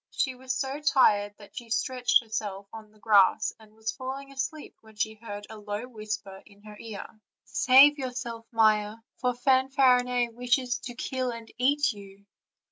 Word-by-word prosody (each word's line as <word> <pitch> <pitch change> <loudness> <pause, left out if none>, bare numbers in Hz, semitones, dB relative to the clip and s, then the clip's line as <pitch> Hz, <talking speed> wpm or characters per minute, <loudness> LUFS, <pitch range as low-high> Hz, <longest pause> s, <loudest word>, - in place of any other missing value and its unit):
She 260 - -1
was 255 0 -4
so 275 +1 -3
tired 205 -8 +3
that 205 - -16
she 235 -1 -8
stretched 250 +2 +2
herself 205 -3 -4
on 220 -1 -10
the 215 - -24
grass 205 -3 +3
and 215 -1 -19
was 220 0 -3
falling 270 +2 -7
asleep 275 +3 -5
when 220 -1 -18
she 220 +1 -1
heard 205 -2 -8
a 220 0 -10
low 210 +3 -5
whisper 215 -4 -6
in 205 -1 -21
her 210 -1 -11
ear: 220 -3 -7 0.4
"Save 280 +3 +6
yourself, 240 -3 -5
Maia, 215 -2 +3 0.2
for 250 -1 -1
Fanfarinet 250 -2 +3
wishes 245 +1 0
to 245 - -7
kill 255 +1 -3
and 230 -1 -8
eat 280 0 +2
you." 200 -1 -14
230 Hz, 165 wpm, -27 LUFS, 215-260 Hz, 0.4 s, Save